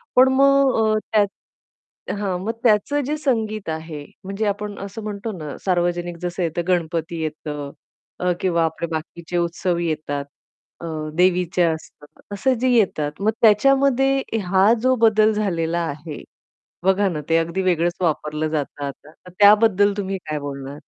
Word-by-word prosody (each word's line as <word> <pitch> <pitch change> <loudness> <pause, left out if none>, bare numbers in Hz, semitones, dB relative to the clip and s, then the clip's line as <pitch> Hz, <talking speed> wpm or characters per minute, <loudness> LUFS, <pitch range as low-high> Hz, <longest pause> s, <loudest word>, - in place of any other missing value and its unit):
पण 260 +1 +7
मग 275 0 +4 0.2
अ, - - +2
त्यात 210 -2 +4 0.9
हां, 195 -3 -1
मग 225 - -1
त्याचं 240 +6 +3
जे 300 +3 -1
संगीत 220 - -1
आहे, 160 -2 -5 0.2
म्हणजे 200 +3 -3
आपण 205 0 -3
असं 200 +2 -7
म्हणतो 210 +1 -4
ना, 150 -3 -6
सार्वजनिक 175 -1 0
जसं 180 0 -3
येतं, 165 +1 -1
गणपती 165 -1 -1
येतं 150 -2 -5 0.5
अ, 180 0 +1
किंवा 170 -3 +2
आपले 160 +1 -3
बाकीचे 165 +2 -4
उत्सव 170 +1 -1
येतात. 155 -4 -2 0.6
अ, - - -6 0.3
देवीच्या 180 -1 +2
असतात. 155 -2 -11 0.3
असं 205 +7 +1
जे 255 - +2
येतात, 190 -11 +2
मग 215 +2 +3
त्याच्यामध्ये 270 +4 +4 0.2
हा 190 +4 +4
जो 255 0 +4
बदल 220 -1 +5
झालेला 170 -5 -1
आहे, 150 +1 -7 0.6
बघा 190 +1 +3
ना, 155 -3 -4
ते 165 - +4
अगदी 170 +3 -1
वेगळंच 175 -1 +1
वापरलं 155 -2 -1
जातं 145 -2 -3
आता, 140 +2 -9
तर 180 +2 -17
त्याबद्दल 205 -1 +5
तुम्ही 195 -1 -2
काय 150 - -2
बोलणार? 140 0 -7
180 Hz, 150 wpm, -22 LUFS, 160-210 Hz, 0.9 s, पण